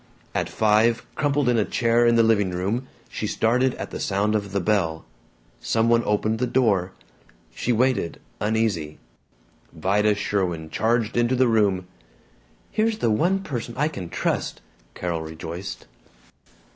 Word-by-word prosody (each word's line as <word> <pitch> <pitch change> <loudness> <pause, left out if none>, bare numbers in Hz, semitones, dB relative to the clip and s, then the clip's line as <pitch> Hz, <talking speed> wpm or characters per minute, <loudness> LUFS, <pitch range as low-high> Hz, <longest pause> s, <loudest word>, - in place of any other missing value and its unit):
At - - -1
five, 110 +2 +2
crumpled 145 -2 +1
in 120 -2 +3
a - - +3
chair 115 +2 +2
in 120 - +4
the 115 - +5
living 105 -4 +3
room, 100 +9 -2 0.2
she - - -4
started 125 +3 +1
at - - -6
the - - -5
sound 100 +2 0
of 100 -2 -1
the 100 - 0
bell. 85 -4 0 0.5
Some 115 +1 +1
one 115 0 +4
opened 110 +1 0
the 125 - +1
door. 105 -8 +1 0.6
She 125 - -1
waited, 120 -7 +1 0.2
uneasy. 105 -8 -1 0.7
Vida 105 +5 +1
Sherwin 90 -6 -2
charged 115 0 0
into 120 +2 +2
the 130 0 +3
room. 100 -5 +2 0.9
"Here's 220 0 +1
the 115 - +1
one 180 - +1
person 120 -6 -5
I 150 +3 +2
can 95 - -7
trust!" - - -2 0.4
Carol 85 -2 -2
rejoiced. 80 +4 -7
110 Hz, 145 wpm, -24 LUFS, 95-120 Hz, 0.9 s, the